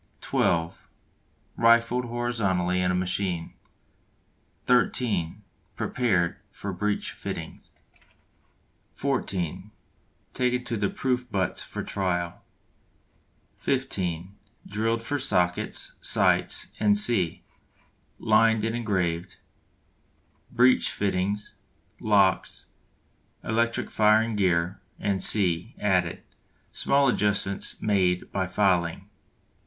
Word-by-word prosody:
(12) 85 0 -1 0.7
Rifled 115 +2 +3
horizontally 100 -7 0
in 90 - +1
a 90 - +1
machine. 90 -1 -2 1.1
(13) 105 -6 +1 0.3
Prepared 95 -9 0
for 100 -1 -6
breech 105 +3 -1
fittings. - - -7 1.3
(14) 95 - -2 0.6
Taken 125 0 0
to 125 -2 -3
the 100 -2 0
Proof 125 -2 -2
Butts 95 -4 -1
for - - -6
trial. 90 -3 -2 1.1
(15) 95 -9 -2 0.3
Drilled 115 +3 -1
for 145 +5 -2
sockets, 90 -9 0
sights, - - +2 0.3
&c. 95 -5 +2 0.7
Lined 110 0 +3
and 115 +1 -1
engraved. 90 -6 -2 1.1
Breech 125 +2 +4
fittings, 100 +1 -2 0.4
locks, 100 -4 +2 0.8
electric 115 +1 -1
firing 110 +1 +3
gear, 90 -2 +1 0.4
&c., 95 +1 +2
added. 90 -4 0 0.5
Small 140 0 +2
adjustments 100 -4 0
made 95 -4 +1
by 95 -1 -1
filing. 90 -3 +1
100 Hz, 85 wpm, -26 LUFS, 90-115 Hz, 1.3 s, Breech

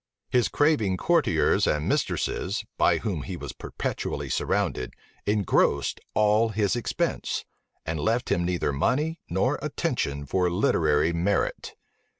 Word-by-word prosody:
His 125 -1 +3
craving 130 -11 +2
courtiers - - +2
and 75 0 0
mistresses, 100 +3 -1
by - - +3
whom - - -3
he - - -6
was - - -7
perpetually - - -4
surrounded, 65 - -1 0.3
engrossed 105 -2 +2 0.2
all 110 +2 +4
his 105 -1 +1
expense, 120 - -2 0.4
and 80 0 -2
left 115 +9 0
him 85 - +2
neither 85 -4 0
money 150 - 0
nor 95 +3 +1
attention 70 0 -2
for 90 +5 +1
literary 80 -3 +2
merit. 90 +4 -1
95 Hz, 125 wpm, -26 LUFS, 80-110 Hz, 0.4 s, all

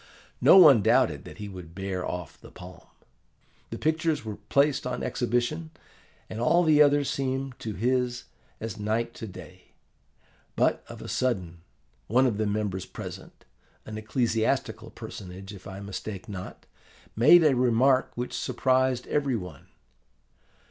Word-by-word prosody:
No - - +8
one 145 - +8
doubted - - +2
that - - -11
he 105 -1 -6
would 90 -4 -10
bear 95 -1 -3
off 90 -3 -6
the - - -13
palm. 90 0 -13 0.8
The - - -6
pictures 160 -3 0
were 105 -2 -5
placed 140 -2 +2
on 125 -1 -3
exhibition, 120 +7 -1 0.6
and 110 - -6
all 170 +8 +4
the 155 -2 +5
others 145 -1 +4
seemed 135 0 -2
to 110 -2 -5
his 125 +2 0 0.4
as 110 -2 -6
night 110 +3 -1
to 110 - -8
day. 90 -1 -13 0.8
But - - +1
of - - -9
a - - -8
sudden, 90 -10 -2 0.5
one 125 +5 +3
of 110 -5 0
the 110 - +1
members 100 -3 -2
present, - - -10 0.4
an 110 - -7
ecclesiastical 110 +1 -1
personage 95 +2 -9
if 100 - -11
I 95 0 -8
mistake 100 -1 -7
not, 95 -3 -8 0.5
made 150 +9 +7
a 150 -4 +4
remark 130 +2 +3
which 125 +1 -4
surprised 130 -1 +1
every 140 -3 0
one. 90 -5 -8
115 Hz, 145 wpm, -27 LUFS, 100-130 Hz, 0.8 s, No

